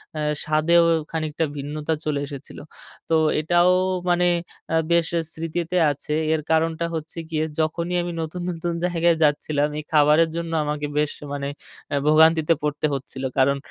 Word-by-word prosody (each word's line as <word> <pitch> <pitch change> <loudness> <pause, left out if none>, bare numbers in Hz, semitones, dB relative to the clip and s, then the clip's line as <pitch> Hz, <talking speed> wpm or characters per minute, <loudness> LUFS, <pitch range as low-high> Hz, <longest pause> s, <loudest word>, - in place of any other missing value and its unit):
অ্যা 155 - -3 0.2
স্বাদেও 155 +3 +4 0.3
খানিকটা 160 0 -1
ভিন্নতা 150 +3 -3
চলে 150 -2 0
এসেছিল। 140 -1 -9 0.5
তো 165 - +3 0.3
এটাও 175 +3 +4 0.4
মানে 175 0 +3 0.5
আ - - +3 0.2
বেশ 170 -1 +3 0.3
স্মৃতিতে 165 +2 -3
আছে। 145 +1 -5 0.2
এর 160 - 0
কারণটা 160 +1 +1
হচ্ছে 160 +1 -6
গিয়ে 155 -1 0 0.2
যখনই 170 +3 -1
আমি 175 - -4
নতুন, 160 +3 -5
নতুন 170 0 -3
জায়গায় 170 -1 +2
যাচ্ছিলাম, 145 0 +1
এই - - -6
খাবারের 150 +2 +5
জন্য 170 -1 -4
আমাকে 150 0 -2
বেশ 150 -1 0 0.2
মানে 140 0 -3 0.4
অ্যা 145 - 0
ভোগান্তিতে 160 +1 +5
পড়তে 150 0 -1
হচ্ছিল। 135 0 -7
কারণ 140 +1 +3
155 Hz, 150 wpm, -23 LUFS, 150-170 Hz, 0.5 s, খাবারের